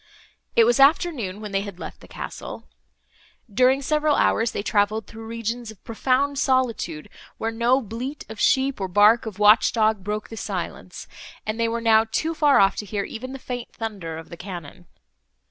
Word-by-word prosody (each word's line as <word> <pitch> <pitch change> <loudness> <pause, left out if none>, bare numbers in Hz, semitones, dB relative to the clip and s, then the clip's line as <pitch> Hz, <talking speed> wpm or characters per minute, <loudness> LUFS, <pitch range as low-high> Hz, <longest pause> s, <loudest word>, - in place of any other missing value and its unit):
It 230 - +7
was 240 +3 +3
afternoon, 275 - +3
when 210 -1 -6
they 195 0 0
had 200 -3 -8
left - - -8
the - - -14
castle. - - -8 0.9
During 255 +4 +3
several 300 +1 +2
hours, 225 +1 +2
they - - -4
travelled 210 0 +1
through 225 +1 -10
regions 230 +1 -4
of 220 -3 -13
profound 270 +4 0
solitude, 235 - 0 0.3
where 225 - -2
no 235 +3 +2
bleat 250 +6 -6
of 220 0 -9
sheep, 265 -4 +2
or 190 - -1
bark 210 +5 +4
of 210 - -7
watch 210 +2 +6
dog, 215 -3 +1
broke 210 +3 -4
on 225 - -7
silence, - - -5 0.4
and 215 +1 -3
they 230 - +2
were 230 +1 -2
now 225 -1 +5
too 315 +8 -1
far 295 -3 +4
off 195 0 +4
to 210 - -4
hear 200 +1 -2
even 255 +6 -7
the 270 - -6
faint 250 -2 -6
thunder 195 -8 -5
of 165 - -10
the 170 - -9
cannon. 175 -2 -9
225 Hz, 185 wpm, -23 LUFS, 205-255 Hz, 0.9 s, It